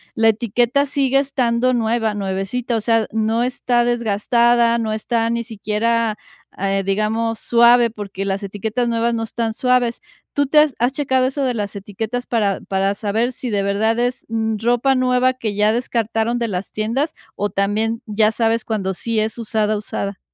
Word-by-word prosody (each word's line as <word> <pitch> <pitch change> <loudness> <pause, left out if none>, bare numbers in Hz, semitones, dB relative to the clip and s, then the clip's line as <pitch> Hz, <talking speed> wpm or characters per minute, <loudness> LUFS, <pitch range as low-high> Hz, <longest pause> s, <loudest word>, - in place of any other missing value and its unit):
la 225 0 +4
etiqueta 240 +5 +1
sigue 275 -1 +1
estando 255 -2 +1
nueva, 225 -1 0
nuevecita, 200 +5 -2
o 220 - -2
sea, 225 -1 +2
no 225 +2 0
está 245 -1 +1
desgastada, 235 +1 +2
no 225 -2 -2
está 230 +1 -1
ni 235 0 -1
siquiera, 225 0 -1 0.4
eh, 195 0 0
digamos, 220 +3 0
suave, 235 0 +5
porque 200 -3 -6
las 195 +1 -2
etiquetas 220 +5 -2
nuevas 235 0 0
no 225 -1 -1
están 225 0 -3
suaves, 250 0 +1 0.3
¿tú 285 - +2
te 300 +3 +4
has 300 -4 +3
has 245 +2 +1
checado 260 -2 +1
eso 270 +2 -1
de 255 - +1
las 205 -2 -4
etiquetas 220 +5 -5
para 210 -5 0
para 195 +1 0
saber 220 +4 -1
si 250 0 -5
de 200 -2 0
verdad 210 +3 +1
es 245 +1 -1 0.4
ropa 245 +3 +2
nueva 255 0 +2
que 220 -5 -4
ya 210 +1 +3
descartaron 230 -1 -1
de 235 - -1
las 185 0 -4
tiendas, 245 +9 -1 0.2
o 205 0 -1
también 215 +4 -1
ya 215 0 +2
sabes 225 0 0
cuando 195 -4 -2
sí 230 +4 -2
es 220 +1 -1
usada, 215 -2 0
usada? 200 -1 -5
230 Hz, 170 wpm, -20 LUFS, 210-240 Hz, 0.4 s, suave